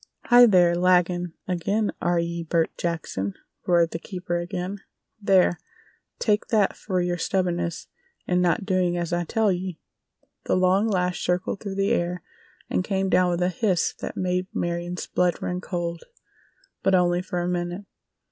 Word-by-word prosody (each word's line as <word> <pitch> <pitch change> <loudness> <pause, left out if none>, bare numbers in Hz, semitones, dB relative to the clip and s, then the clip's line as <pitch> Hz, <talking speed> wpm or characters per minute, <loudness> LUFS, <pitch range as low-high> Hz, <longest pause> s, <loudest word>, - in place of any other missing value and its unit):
"Hi, 245 0 +8
there! 180 -4 +5
Laggin' 180 -1 +2
ag'in, 200 +4 0
air 175 0 +1
ye, 170 0 -1
Bert 165 0 0
Jackson!" 155 - -3 0.3
roared 170 -2 +3
the 165 - -4
keeper 175 -1 -4
again. 180 +2 -4 0.4
"There! 185 -4 +3 0.6
Take 210 -2 +1
that 210 -4 +2
fer 185 -3 -2
yer 175 0 -1
stubbornness 175 -2 -1 0.4
in 180 0 +1
not 180 +2 +1
doin' 185 -3 +1
as 175 0 -2
I 175 0 0
tell 220 +2 +2
ye!" 180 -2 -4 0.7
The - - +1
long 185 +3 +3
lash 180 -4 0
circled 180 +2 -1
through 200 -2 -5
the 195 0 +1
air 175 0 -1 0.4
and - - 0
came 195 0 -1
down 180 -1 +4
with 175 0 0
a 180 - +2
hiss 185 -1 0
that - - -6
made 180 0 -1
Marion's 175 +1 -2
blood 180 -2 +1
run 180 0 -3
cold—but 175 - -5
only 175 -1 +3
for 180 -1 -3
a - - -2
minute. 175 +2 -3
180 Hz, 155 wpm, -25 LUFS, 175-190 Hz, 0.7 s, Hi